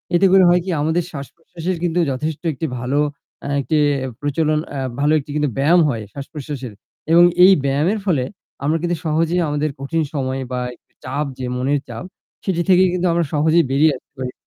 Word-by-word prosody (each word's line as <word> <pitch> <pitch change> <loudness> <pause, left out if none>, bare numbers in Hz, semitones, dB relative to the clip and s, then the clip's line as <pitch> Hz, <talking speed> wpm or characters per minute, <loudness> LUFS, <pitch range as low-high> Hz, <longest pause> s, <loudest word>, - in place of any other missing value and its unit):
এতে 175 - +4
করে 190 0 +7
হয় 175 - +5
কি, 190 - -4
আমাদের 160 +3 +1
শ্বাস-প্রশ্বাসের 165 +5 -6
কিন্তু 175 0 +1
যথেষ্ট 150 +4 -3
একটি 135 - -4
ভালো 130 +4 0 0.5
আ - - -3
একটি 155 +4 -1 0.5
প্রচলন 150 +1 +1 0.2
এ - - -3 0.2
ভালো 145 +1 +2
একটি 145 - -9
কিন্তু 150 -2 +1
ব্যায়াম 155 +6 +4
হয় 115 -4 -2
শ্বাস-প্রশ্বাসের 140 -3 -7 0.4
এবং 170 +1 +7 0.2
এই 190 - +9
ব্যায়ামের 150 +10 +1
ফলে 160 -10 +1 0.4
আমরা 155 +3 +2
কিন্তু 175 0 0
সহজেই 165 +3 +1
আমাদের 150 +1 0
কঠিন 160 +4 -1
সময় 135 -1 -2
বা 125 - -1 0.2
একটু - - -39
চাপ 140 +4 -2
যে 130 - -3
মনের 140 +3 +1
চাপ - - -6 0.4
সেটি 180 -3 0
থেকেই 185 0 +5
কিন্তু 180 0 0
আমরা 170 0 +1
সহজেই 160 +3 +3
বেরিয়ে 150 +3 +4
আসতে - - -27
পারি। 130 -1 -3
155 Hz, 180 wpm, -20 LUFS, 140-170 Hz, 0.5 s, এই